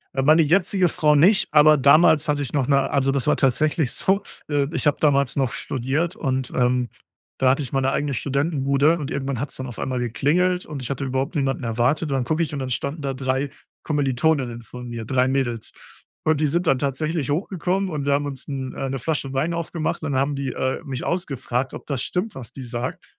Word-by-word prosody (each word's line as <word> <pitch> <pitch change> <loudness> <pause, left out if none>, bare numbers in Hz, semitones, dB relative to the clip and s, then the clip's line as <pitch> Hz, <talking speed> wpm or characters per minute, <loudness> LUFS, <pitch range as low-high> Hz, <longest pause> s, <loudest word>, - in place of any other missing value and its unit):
Äh, 135 - +1
meine 155 +4 +6
jetzige 180 +3 +2
Frau 155 -3 +3
nicht, 190 +8 +5
aber 155 0 +6
damals 155 +3 +5
hatte 145 -1 +1
ich 135 - -6
noch 140 -4 +1
'ne 140 -1 +2
also, 135 -1 +2
das 135 0 -1
war 150 - +3
tatsächlich 150 +1 +1
so, 195 +2 +1 0.3
äh, 145 -2 +1
ich 160 - 0
habe 145 - +3
damals 140 -4 +2
noch 135 -4 0
studiert 145 - -2
und, 130 - -2
ähm, 125 -1 +1 0.5
da 130 - +3
hatte 135 +3 +2
ich 125 - -6
meine 135 0 +1
eigene 145 0 -1
Studentenbude 140 +2 +1
und 145 -2 -4
irgendwann 135 -2 -3
hat's 140 +3 -4
dann 130 - -5
auf 120 - -8
einmal 130 -1 -2
geklingelt 155 +10 +1
und 145 -3 -6
ich 125 - -6
hatte 140 0 -3
überhaupt 135 +5 -2
niemanden 135 -2 -1
erwartet 125 +7 0
und - - +1
dann 130 - 0
gucke 155 +6 +1
ich 155 - -4
und 145 - -3
dann 130 -1 -3
standen 140 +5 -3
da 135 -1 -2
3 130 +1 -1 0.3
Kommilitoninnen 135 -3 0
von 125 +2 -9
mir, 115 -2 -6
3 130 +2 +2
Mädels. 130 -4 -1 0.5
Und 155 -2 +2
die 155 - +2
sind 170 +4 0
dann 135 - +4
tatsächlich 145 +2 -1
hochgekommen 185 +3 -1
und 150 -4 -3
wir 140 - +2
haben 145 +1 +1
uns 135 -2 -7
'n 135 -2 -4
äh, 135 - -3
'ne 135 0 -3
Flasche 135 0 -2
Wein 155 +6 0
aufgemacht 165 -1 -3
und 150 - -2
dann 130 - +1
haben 140 +1 0
die, 140 -1 -3
äh, 130 0 -2
mich 130 -3 -5
ausgefragt, 135 -7 -2
ob - - -9
das 135 -4 -2
stimmt, 190 +4 -3
was 125 -5 -8
die 135 - -9
sagt. 120 +1 -4
140 Hz, 225 wpm, -23 LUFS, 130-155 Hz, 0.5 s, meine